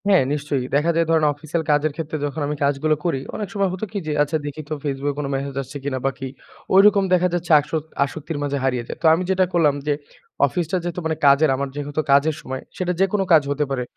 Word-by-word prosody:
হ্যাঁ, 190 -7 +5
নিশ্চয়ই 145 -3 -2
দেখা 155 +4 +3
যায় 165 0 +3
ধরেন 160 -2 +3
অফিসিয়াল 155 +3 -3
কাজের 150 +1 +2
ক্ষেত্রে 155 -1 -4
যখন 145 +1 -4
আমি 150 - -2
কাজগুলো 145 +2 +2
করি। 165 -6 +1 0.2
অনেক 210 - -3
সময় 200 -2 +1
হতো 190 +3 -3
কি, 210 - -4
যে - - -1
আচ্ছা 150 +2 -1
দেখি 145 +1 -5
তো - - -2
Facebook 140 0 -1
এ - - -19
কোনো 140 -2 -2
মেসেজ 135 0 -4
আসছে 135 +2 -8
কিনা 135 -2 -2
বা 135 - +2
কি 135 - -4 0.5
ওইরকম 200 0 +6
দেখা 180 0 +4
যাচ্ছে 175 -1 -2
আসক 150 +1 -3 0.2
আসক্তির 150 +2 -5
মাঝে 140 0 -1
হারিয়ে 125 -2 0
যাই। - - -6
তো - - -3
আমি 170 +3 +1
যেটা 190 0 +3
করলাম, 155 -5 +3
যে 150 - +3 0.5
অফিসটা 170 +5 -1
যেহেতু 175 0 -3
মানে 160 0 0
কাজের 140 +2 +6
আমার 140 +1 -2
যেহেতু 145 +1 -2
কাজের 140 +2 +4
সময়। 130 0 -5 0.2
সেটা 180 -2 -1
যেকোনো 195 +1 +2
কাজ 160 - +7
হতে 145 +1 0
পারে। 130 -2 -1
150 Hz, 230 wpm, -22 LUFS, 140-170 Hz, 0.5 s, কাজ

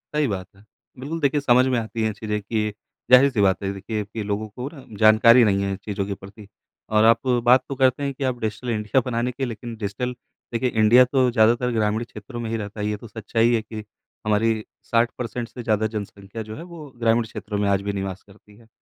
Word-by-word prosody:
सही 150 -1 +2
बात 95 -4 -4
है। 100 - -20 0.4
बिल्कुल 150 +6 -4
देखिए 145 -1 +1
समझ 125 -2 +4
में 130 -1 +1
आती 115 0 -4
हैं 110 - +1
चीज़ें 105 0 -3
कि 105 0 -2 0.4
ज़ाहिर-सी 125 -3 +6
बात 95 -1 +2
है 95 - -1
देखिए 105 +2 -4
कि 105 +2 -6
लोगों 105 +1 -2
को 125 +5 -6
ना 135 - -12
जानकारी 110 +3 +7
नहीं 100 -2 +2
है 100 - -1
इन - - -2
चीज़ों 100 -2 -2
के 100 - -3
प्रति 100 +2 -12 0.4
और 110 0 +3
आप 115 +3 +4 0.2
बात 125 +2 +5
तो 140 - -3
करते 130 +1 +2
हैं 140 0 -1
कि 135 - -6
आप 130 -2 -1
डिजिटल 110 +2 -4
इंडिया 110 +3 +1
बनाने 120 0 -1
की 135 +2 -3
लेकिन 120 0 -6
डिजिटल 110 +4 -3 0.4
देखिए 120 +2 +1
इंडिया 115 +3 +6
तो 130 0 +2
ज़्यादातर 120 +2 +3
ग्रामीण 110 0 0
क्षेत्रों 120 +2 -9
में 115 -1 -4
ही 115 - -1
रहता 105 0 -7
है। 105 - -1
ये 105 0 -2
तो 115 - -11
सच्चाई 115 +2 0
है 115 - +2
कि 110 -1 -8 0.4
हमारी 110 +1 +1 0.2
60% 115 0 -1
से 125 - -8
ज़्यादा 110 -1 +1
जनसंख्या 100 0 -6
जो 110 - -6
है 165 - -8
वो 170 -3 -10
ग्रामीण 115 0 +3
क्षेत्रों 105 -1 -6
में 100 - +1
आज 100 -1 +2
भी 100 0 -3
निवास 95 -1 -4
करती 105 +1 -20
है। 115 0 -20
110 Hz, 225 wpm, -23 LUFS, 105-125 Hz, 0.4 s, जानकारी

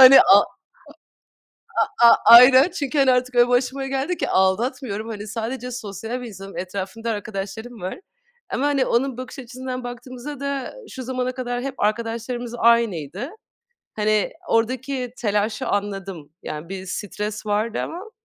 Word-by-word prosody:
Hani, 260 +1 +11
a - - +7 1.4
a - - +6 0.2
a - - +8
aynen, 255 +5 +9
çünkü 285 -4 -3
hani 270 -1 +5
artık 250 0 0
öyle 240 0 +6
başıma 260 +2 0
geldi 275 +6 -1
ki - - -2
aldatmıyorum. 220 +3 0
Hani, 210 -1 -6
sadece 240 +3 -4
sosyal 225 +1 -5
bir 245 - -6
insanim. 195 -2 -10
Etrafımda 195 +5 -4
arkadaşlarım 215 +2 -6
var 185 - -5 0.5
ama 275 - -1
hani 275 -3 +2
onun 250 +1 0
bakış 255 +2 -7
açısından 255 0 -6
baktığımızda 255 +3 -7
da, 280 -1 -3 0.2
şu 260 - -7
zamana 255 0 -2
kadar 245 -1 -3
hep 270 0 -4
arkadaşlarımız 235 +2 -2
aynıydı. 220 - +2 0.7
Hani, 215 0 +1 0.2
ordaki 250 +2 0
telaşı 210 0 -1
anladım. 195 -6 -3
Yani, 155 +3 -6
bir 190 -1 -6
stres 210 +3 -4
vardı 215 +2 0
ama 375 +7 -6
235 Hz, 140 wpm, -22 LUFS, 210-255 Hz, 1.4 s, Hani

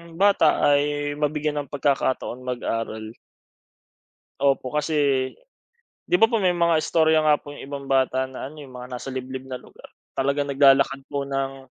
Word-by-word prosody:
bata 195 -4 +3
ay 145 0 +2
mabigyan 150 0 -1
ng 145 -2 -7
pagkakataon 135 -3 0
mag-aral. 115 -3 -3 1.3
Opo 135 -2 +1
kasi, 145 -3 +1 0.8
'di - - +2
ba 225 - +7
po, 235 - +1
may 185 -2 +3
mga 170 -1 +2
istorya 160 -1 +3
nga 150 -1 +4
po 145 - -10
'yong - - -9
ibang 140 0 -7
bata 130 -1 +1
na 130 0 -7
ano, 155 0 -12
eh, - - -8
'yong 130 - -15
mga 125 0 -8
nasa 125 +2 -6
liblib 130 0 -6
na 130 - -4
lugar. - - -16 0.2
Talagang 140 +1 0
naglalakad 135 0 +4
po 140 -1 -2
ng 135 -1 -3
140 Hz, 165 wpm, -24 LUFS, 130-150 Hz, 1.3 s, ba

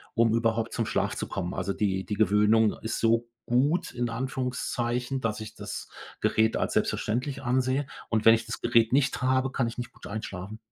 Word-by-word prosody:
um 115 -1 +4
überhaupt 115 0 +1
zum 115 - 0
Schlaf - - 0
zu - - -4
kommen. 95 -1 -3
Also 95 +1 -1
die 95 -2 -1
die 105 - -4
Gewöhnung 105 +1 +4
ist 110 - -2
so 115 +1 +2 0.2
gut 140 +8 +2
in 120 -1 -2
Anführungszeichen, 125 0 -2
dass 110 -1 -1
ich 110 - -8
das - - -6 0.3
Gerät 110 0 +2
als - - -1
selbstverständlich 130 +5 -1
ansehe 130 +2 +1 0.2
und 110 -1 0
wenn 115 0 +9
ich 115 0 -4
das - - -6
Gerät 115 +1 +3
nicht 140 -1 +2
habe, 130 +1 +2
kann 120 -3 0
ich 115 - -6
nicht 120 - -5
gut - - -14
einschlafen. 105 0 -6
115 Hz, 190 wpm, -27 LUFS, 110-125 Hz, 0.3 s, wenn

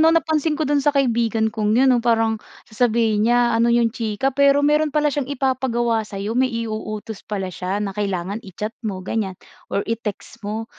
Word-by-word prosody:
'no 320 - +6
napansin 320 -2 +2
ko 315 - 0
do'n 290 0 +2
sa 285 - +1
kaibigan 230 -4 +1
kong 215 0 +1
'yon 265 +2 +5
'no 245 - +3
parang 225 -2 +1 0.2
sasabihin 225 -1 +1
niya, 240 -1 +3
"Ano 230 +1 +3
yung 235 -1 +3
chika?" 235 +3 -1
Pero 280 +1 +4
meron 300 +1 +3
pala 295 0 +1
siyang 280 -1 -2
ipapagawa 250 -4 0
sa'yo, 210 0 -4
may 255 +2 +2
i-uutos 220 -2 -5
pala 190 -3 -3
siya 185 +3 -3
na 195 - -3
kailangan 200 0 -2
i-chat 210 +3 -6
mo 190 -5 -4
ganiyan 195 -4 -2 0.3
or 200 - -1
i-text 230 0 -5
mo. 215 +2 -4
230 Hz, 185 wpm, -21 LUFS, 210-260 Hz, 0.3 s, no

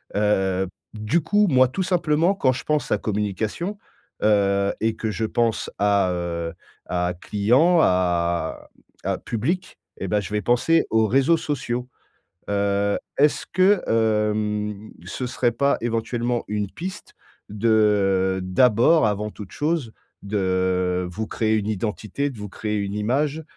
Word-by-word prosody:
Heu, 95 -2 +1 0.3
du 110 +11 0
coup 205 +6 +2
moi 130 -2 +5
tout 165 +9 -2
simplement 175 0 +2
quand 130 -8 +2
je - - -6
pense 150 -1 -1
à - - +3
communication, 105 - -3 0.5
heu, 100 -1 +3
et 110 0 0
que 110 -1 -3
je 110 - -2
pense 115 0 0
à, 100 -2 +2
heu, 85 -1 -3 0.3
à 90 0 -1
client 130 - +3
à 85 -2 0 0.3
à - - -1
public 170 - -3 0.2
et 95 - -4
bah, 105 +2 +1
je 105 +2 -7
vais 105 - 0
penser 125 - +2
aux 110 -1 +3
réseaux 135 +8 +3
sociaux. 125 -5 -3 0.6
Heu, 100 0 +1 0.2
est-ce 150 +1 +3
que 185 +1 +4
hem 105 -1 0
ce 125 +7 -4
serait 120 0 0
pas, 140 +4 +1
éventuellement, 120 +1 -1
une 105 -2 -2
piste, 185 +3 -8 0.3
de, 105 +3 -1 0.7
heu - - -3
d'abord 120 - +4
avant 105 +1 -1
toute 105 -3 -10
chose, 150 -7 -1 0.3
de 95 -2 0
vous 110 +5 -4
créer 110 0 0
une 105 - -1
identité, 110 +6 -2
de 120 - -11
vous 105 0 -6
créer 105 +2 -3
une 100 -1 -3
image, 140 +9 0
110 Hz, 145 wpm, -23 LUFS, 100-130 Hz, 0.7 s, moi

